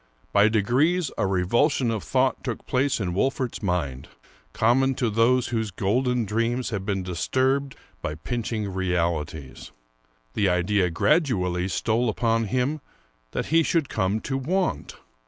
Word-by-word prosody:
By 100 +1 +5
degrees 130 - +2
a 95 - 0
revulsion 115 - +2
of 110 -3 -2
thought - - +1
took - - -4
place 130 +1 +1
in 90 -4 -2
Wolfert's 130 +4 -1
mind, 85 - -2 0.4
common 130 +4 +2
to 120 -3 0
those 120 +3 +3
whose 110 -3 -1
golden 120 +5 0
dreams 115 +4 -1
have 100 -3 -4
been 95 -2 -1
disturbed 130 +10 0 0.3
by 75 - -3
pinching 110 +3 -3
realities. 85 -6 -2 0.6
The 100 -2 +2
idea 90 +1 +2
gradually 90 - +1
stole 115 +4 0
upon 115 +1 +1
him 130 +8 -1 0.5
that - - -2
he 165 - +6
should 160 -3 0
come 100 +1 0
to 135 -1 -2
want. 180 +8 -1
110 Hz, 135 wpm, -25 LUFS, 95-130 Hz, 0.6 s, he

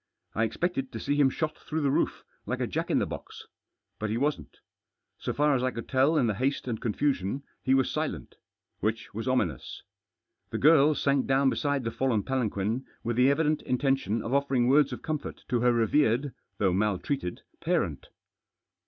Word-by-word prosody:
I 110 - +1
expected 135 0 -2
to 110 - -4
see 145 - -1
him 145 -2 +4
shot 155 +3 -2
through 160 0 -3
the 140 -2 +2
roof, - - 0 0.2
like - - -2
a - - 0
jack - - -3
in - - +2
the - - +2
box. - - -8 0.5
But 110 - -2
he 110 - -1
wasn't. 145 +4 -2 0.6
So - - -2
far 150 0 +2
as 130 - +1
I 130 - +2
could 115 -2 -7
tell 140 +4 +3
in 130 - +3
the 110 - +1
haste 130 +6 -1
and 115 -3 -3
confusion 130 0 -1 0.2
he 130 - +3
was 135 -1 +2
silent - - -3 0.5
Which 110 +2 -2
was 115 +4 -4
ominous. 95 - -1 0.7
The - - -3
girl 150 0 +5
sank 140 -2 +1
down 135 0 +3
beside 145 -2 0
the 115 - -2
fallen 115 -3 0
palanquin 115 -2 -1 0.2
with 120 0 -1
the 125 +2 +5
evident 150 +1 +2
intention 125 -4 0
of 120 - -3
offering 140 -3 +2
words 140 +1 +4
of 125 - -6
comfort 155 -2 -4
to 125 -3 +1
her 125 +1 +4
revered, 120 +3 +2 0.2
though 95 -3 +2
maltreated, 100 +1 -1 0.2
parent. - - -1
130 Hz, 185 wpm, -28 LUFS, 115-140 Hz, 0.7 s, girl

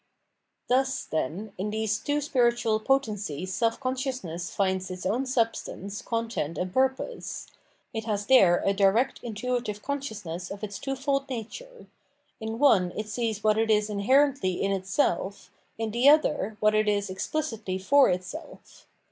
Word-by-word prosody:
Thus, 265 +1 +1
then, 170 +8 -3
in 205 +3 -1
these 215 0 -1
two 290 +5 -1
spiritual 240 -5 +2
potencies 210 - -1
self 230 +2 +1
consciousness 255 - -3
finds 190 -1 -1
its 185 0 -6
own 240 +8 0
substance, 225 -4 -2
content, 230 -9 -2
and 180 0 -3
purpose; 265 - -1 0.5
it 220 -1 -4
has 205 -2 -1
there 195 -9 +5
a 195 - +3
direct 200 +6 +2
intuitive 235 -2 -3
consciousness 210 - -4
of 200 +1 -8
its 205 -1 -5
twofold 275 0 -1
nature; 470 - -7 0.5
in 220 +1 -4
one 205 -10 +4
it 215 0 -4
sees 220 -2 -2
what 215 0 +3
it 225 0 +1
is 210 0 +2
inherently 260 0 +3
in 195 - +1
itself, 195 0 -1 0.3
in 225 -1 -2
the 240 +5 +5
other 295 -8 +3
what 215 0 +3
it 215 0 +3
is 205 -1 +1
explicitly 215 -3 -3
for 275 +9 +5
it 180 0 0
self. 310 - -11
220 Hz, 150 wpm, -27 LUFS, 195-260 Hz, 0.5 s, there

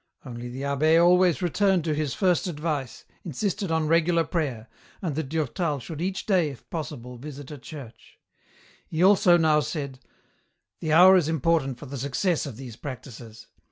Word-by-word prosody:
Only 120 -1 -7
the 130 +3 -6
abb^ 150 +4 +3
always 180 0 +4
returned 190 0 +2
to 155 -1 0
his 150 -3 -2
first 185 -2 +1
advice, 150 -6 -4 0.2
insisted 190 +4 -2
on 160 -1 +1
regular 165 +1 +3
prayer, 140 -8 -3 0.3
and 170 -5 -3
that 155 -3 -3
Durtal 155 0 -1
should 155 +5 -7
each 190 +1 -3
day, 180 -7 +2
if 135 -5 -12
possible, 125 -6 -6
visit 145 0 -9
a 145 - -8
church. 120 -4 -12 0.7
He 160 +2 -1
also 185 -2 +6
now 155 -2 +3
said, 140 -3 -4 0.4
" - - -49
The 155 - -2
hour 185 +4 +8
is 165 -4 +1
important 160 -4 +1
for 145 - -10
the 140 0 -7
success 140 +6 0
of 125 -6 -8
these 125 -4 -9
practices. 120 -4 -9
155 Hz, 170 wpm, -25 LUFS, 135-170 Hz, 0.7 s, hour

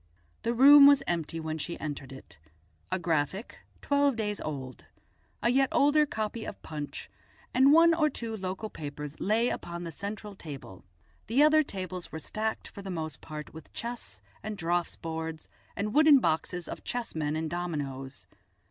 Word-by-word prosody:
The 235 +1 -1
room 280 +3 +10
was 285 -1 +6
empty 165 -1 -2
when 160 0 -4
she 170 +3 -5
entered 145 -3 -5
it; 135 -11 -13 0.5
a - - +1
Graphic 170 - -1 0.2
twelve 285 -2 +3
days 210 -2 -2
old, 130 -4 -6 0.6
a 235 - +4
yet 270 +1 +3
older 295 +1 +4
copy 220 -1 -3
of - - -7
Punch, 145 -3 -6 0.5
and 265 +2 +6
one 330 +2 +7
or 310 -2 +3
two 230 -5 -5
local 190 +2 -4
papers 150 0 -6
lay 225 +4 +2
upon 170 0 -5
the 165 - -5
central 205 +4 -6
table; 140 - -9 0.4
the 255 +7 +4
other 310 +1 +6
tables 185 - -5
were - - -5
stacked 215 +7 -3
for 200 - -10
the 195 - -7
most 160 -5 -4
part 150 -1 -8
with 160 0 -12
chess 230 - -6 0.2
and 215 -1 -5
draughts 175 0 -1
boards, 160 -1 -5 0.3
and 210 +1 -2
wooden 305 -1 +7
boxes 175 - -1
of - - -7
chessmen 160 -11 -2
and 160 0 -2
dominoes. 140 -6 -4
185 Hz, 165 wpm, -29 LUFS, 155-235 Hz, 0.6 s, room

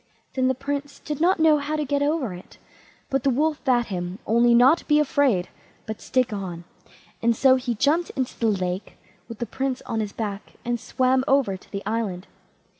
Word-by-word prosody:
Then 260 -1 +1
the 260 - +1
Prince 285 +2 -4
did 300 0 -5
not 360 +2 +3
know 315 -2 +5
how 295 +2 -2
to 300 -1 -1
get 285 +1 0
over 285 - 0
it, 180 +1 -12 0.5
but 270 0 +1
the 275 - +3
Wolf 300 +4 0
bade 245 -4 +2
him 180 -2 -4
only 235 +2 +4
not 260 +8 +5
be 300 - +4
afraid, 265 -10 +2 0.4
but 220 -1 -6
stick 255 -4 0
on, 180 -4 -5 0.6
and 235 0 +3
so 260 +2 +5
he 250 -2 -2
jumped 300 +9 +2
into 260 -2 -2
the 230 - +2
lake 185 -2 -2 0.3
with 230 - -7
the 235 - -3
Prince 265 +3 -3
on 225 - -2
his 210 -2 -2
back, 205 -2 -5
and 240 0 -1
swam 255 +2 +1
over 270 -9 +3
to 185 - -15
the 200 -1 -5
island. 210 -4 -2
250 Hz, 195 wpm, -24 LUFS, 210-280 Hz, 0.6 s, know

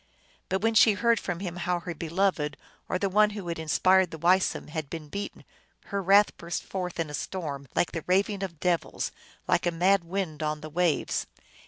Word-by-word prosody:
But 190 - 0
when 225 0 +3
she 220 0 +7
heard 230 +2 +2
from 180 -1 -4
him 175 -3 -4
how 175 0 -1
her 175 0 -5
beloved, 165 -3 0 0.3
or - - +1
the 200 - 0
one 210 +2 +4
who 190 -4 -6
had 170 - -3
inspired 185 +4 +3
the 160 - -7
Weisum, 180 +2 +2
had 155 -2 -4
been 160 -3 -7
beaten, 200 +6 -6 0.5
her 200 - +1
wrath 200 +3 +5
burst 170 +1 -4
forth 180 -3 -4
in 160 -2 -1
a - - -9
storm, 145 -5 -4
like - - +2
the 165 - -4
raving 195 +2 +2
of 175 -5 -5
devils, 175 -1 -1 0.4
like - - +2
a - - +2
mad 180 +3 +3
wind 170 -3 -3
on 150 0 -2
the 155 0 -8
waves. 175 -1 0
180 Hz, 200 wpm, -28 LUFS, 160-195 Hz, 0.5 s, she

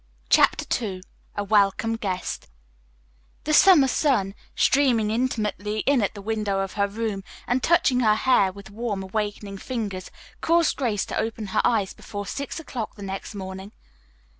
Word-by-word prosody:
CHAPTER - - +4 0.2
II 185 -4 -5 0.3
A 205 - -1
WELCOME 205 +2 +2
GUEST 185 - -4 1.0
The 305 - -1
summer 320 -5 +7
sun, 250 -9 +1 0.2
streaming 245 -6 +3
intimately 215 -3 -1
in 275 -3 +3
at 205 - -1
the 200 - -8
window 210 -2 -1
of 195 -1 -4
her 200 -1 +1
room, 205 -1 -3 0.2
and 250 +1 +1
touching 320 -6 +3
her 215 -3 +4
hair 215 -5 +3
with 200 0 -12
warm, 210 -3 -3
awakening 205 0 -4
fingers, 205 -7 -4 0.3
caused 335 -1 +3
Grace 225 -7 0
to - - -3
open 220 0 -3
her - - +3
eyes 210 -5 +1
before 205 -1 -7
six 280 +9 -5
o'clock 245 -8 -5
the 205 - -9
next 195 +2 -6
morning. 190 +1 -7
215 Hz, 155 wpm, -24 LUFS, 195-245 Hz, 1.0 s, summer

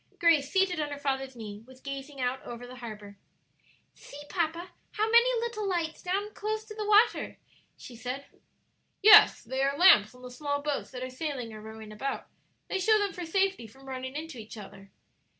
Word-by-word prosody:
Grace, 315 -5 +4
seated 380 -3 +2
on 300 -1 -1
her 285 - -5
father's 270 -2 -2
knee, 210 -3 -8
was 260 0 -15
gazing 275 +1 -7
out 255 +1 -1
over 240 +1 -8
the 250 +1 -11
harbor. 210 -4 -9 0.7
"See, 285 - -13
papa, 340 0 -2 0.2
how 435 +1 0
many 475 +1 +5
little 435 -4 -3
lights 335 -3 -2 0.3
close 435 +1 -3
down - - -21
to - - -6
the 425 -1 -4
water!" 425 +2 +3 0.4
she 245 - -11
said. 255 +4 -5 0.8
"Yes; 430 0 +8
they 265 +1 -3
are 275 +1 +1
lamps 250 - +6
on 250 - -16
the 250 - -8
small 285 +2 -2
boats 290 -1 -2
that 255 -1 -7
are 255 - -4
sailing 255 -5 -4
or 215 - -9
rowing 220 0 -10
about; 265 +6 -4 0.4
they 390 - -2
show 435 +3 +4
them 405 -2 -1
for 355 -2 -6
safety 385 - 0
from 265 +5 -18
running 260 0 -6
into 310 -4 -6
each 220 +1 -10
other." 195 -1 -11
280 Hz, 190 wpm, -29 LUFS, 250-375 Hz, 0.8 s, Yes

